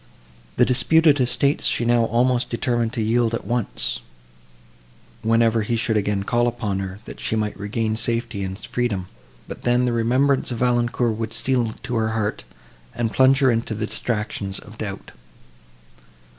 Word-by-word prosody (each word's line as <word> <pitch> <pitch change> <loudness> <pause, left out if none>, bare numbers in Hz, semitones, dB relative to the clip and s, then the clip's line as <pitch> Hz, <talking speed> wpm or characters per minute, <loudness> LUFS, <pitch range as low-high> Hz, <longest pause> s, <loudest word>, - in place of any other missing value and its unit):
The 125 - +5
disputed 150 +4 +4
estates 130 +3 +2
she 120 - +1
now 120 -1 +3
almost 120 +2 +1
determined 120 -1 0
to 115 - -1
yield 115 +1 +2
at - - -6
once, 120 -2 -2 1.2
whenever 115 0 +3
he 110 +3 -1
should 115 0 0
again 100 -1 0
call 120 +4 +1
upon 110 -5 -2
her, 95 0 -5
that - - -10
she - - -2
might 105 -1 -1
regain 110 +2 -2
safety 115 -2 -1
and 95 0 -4
freedom; 105 -5 -3 0.4
but - - -8
then, 120 +1 +2
the 120 - 0
remembrance 130 +4 +2
of 120 - -3
Valancourt 120 -1 +1
would 110 0 -4
steal 120 -3 0
to 125 0 -3
her 110 0 +1
heart, 105 -1 -2 0.5
and 115 -2 -1
plunge 135 +1 +4
her 130 -2 +5
into 115 -1 -1
the 110 +1 -2
distractions 105 -3 -3
of 110 +1 -12
doubt. 100 -3 -6
115 Hz, 160 wpm, -22 LUFS, 110-120 Hz, 1.2 s, The